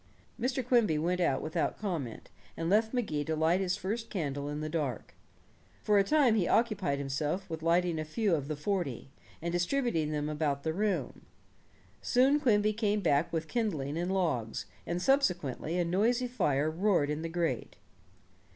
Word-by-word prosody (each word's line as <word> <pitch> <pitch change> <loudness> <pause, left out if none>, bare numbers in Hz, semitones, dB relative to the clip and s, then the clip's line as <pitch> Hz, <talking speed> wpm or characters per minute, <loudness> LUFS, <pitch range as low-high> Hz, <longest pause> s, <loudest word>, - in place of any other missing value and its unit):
Mr. 255 0 -1
Quimby 230 -11 +3
went 180 +4 0
out 155 -6 +1
without 155 - -1
comment, 165 - -4 0.3
and 165 +2 -1
left 220 +2 +3
Magee 195 - -1
to 160 +1 -2
light 160 +4 +2
his 185 -1 0
first 215 +4 -3
candle 145 -6 -3
in 145 0 -4
the 155 - -3
dark. 150 -7 -3 0.7
For 210 -1 +4
a - - +5
time 280 0 +4
he 205 -6 +2
occupied 205 -11 +1
himself 145 +7 -2
with 160 -1 -4
lighting 170 0 +2
a - - -1
few 195 +5 0
of 145 -4 0
the 155 - -2
forty, 150 - -3 0.3
and 170 - -1
distributing 175 - 0
them 150 -1 -1
about 150 -2 -1
the 160 - -1
room. 205 +3 -2 0.7
Soon 270 +4 +3
Quimby 215 -6 +3
came 210 -1 0
back 145 -2 +2
with 160 -1 -2
kindling 160 - -1
and 175 +3 -1
logs, 145 - -1 0.2
and 170 +1 -1
subsequently 180 - +1
a 175 - +1
noisy 230 +8 +1
fire 155 - +1
roared 170 -4 +2
in 150 +1 -3
the 165 - -4
grate. 170 0 -2
175 Hz, 170 wpm, -31 LUFS, 150-210 Hz, 0.7 s, a